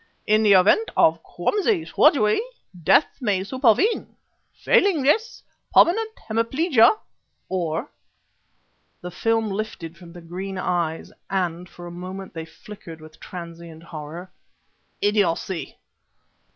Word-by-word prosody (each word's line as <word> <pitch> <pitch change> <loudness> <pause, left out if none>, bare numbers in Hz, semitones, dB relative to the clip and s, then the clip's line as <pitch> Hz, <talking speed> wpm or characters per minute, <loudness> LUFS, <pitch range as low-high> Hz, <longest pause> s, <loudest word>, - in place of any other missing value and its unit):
In 215 +1 +3
the 210 -2 +5
event 200 - +4
of 160 +1 +4
clumsy 380 - 0
surgery, 215 - +3 0.4
death 285 - +5 0.2
may 200 -6 0
supervene; 260 - +1 0.4
failing 365 -8 +2
this, 425 - +1 0.3
permanent 440 +6 +5 0.2
hemiplegia 230 - +3 0.5
or" 175 - -2 1.1
the 180 - -7
film 225 +3 0
lifted 195 -5 -5
from 175 -2 -13
the 175 - -11
green 185 +3 -6
eyes, 170 -3 -2 0.2
and 180 -2 -2
for 175 - -12
a 175 - -8
moment 185 +2 -8
they 165 -1 -6
flickered 165 -1 -12
with 155 0 -15
transient 170 -2 -10
horror 165 +3 -9 0.7
"idiocy! 195 -4 0
190 Hz, 110 wpm, -23 LUFS, 170-230 Hz, 1.1 s, the